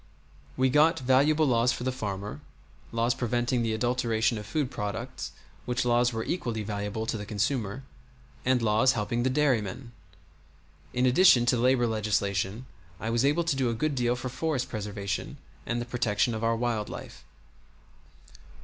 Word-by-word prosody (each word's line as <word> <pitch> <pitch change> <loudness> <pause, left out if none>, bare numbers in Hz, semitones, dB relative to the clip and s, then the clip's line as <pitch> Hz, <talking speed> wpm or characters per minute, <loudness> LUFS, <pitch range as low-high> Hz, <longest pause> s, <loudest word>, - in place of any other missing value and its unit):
We 130 0 +3
got 155 +3 +4
valuable 140 +5 +3
laws 120 -2 +3
for 120 - -4
the 130 - 0
farmer; 105 -5 -5 0.5
laws 115 +1 +1
preventing 120 0 0
the 115 -1 0
adulteration 115 -1 0
of 105 - -9
food 135 +3 -1
products 105 -1 -5 0.3
(which 125 0 -1
laws 120 0 +3
were 115 -1 -3
equally 115 -11 -2
valuable 105 +1 -3
to 110 0 -2
the 105 - -6
consumer), 110 +2 -1 0.6
and 125 -2 +2
laws 110 +4 +4
helping 115 +2 -1
the 130 - +1
dairyman. 130 -4 0 1.0
In 125 +1 +1
addition 130 -1 +6
to 125 - +3
labor 125 +1 +3
legislation 105 0 -1 0.3
I 110 - -3
was 120 +1 +2
able 150 +5 +2
to 165 -4 0
do 130 -3 +1
a 115 - -1
good 155 +6 0
deal 120 -2 +1
for 125 +1 -5
forest 130 -1 -2
preservation 100 -3 -4 0.3
and 120 - -1
the 120 - -3
protection 120 -2 0
of 110 0 -4
our 115 0 +2
wild 115 -3 -1
life. - - -9
120 Hz, 160 wpm, -28 LUFS, 110-130 Hz, 1.0 s, addition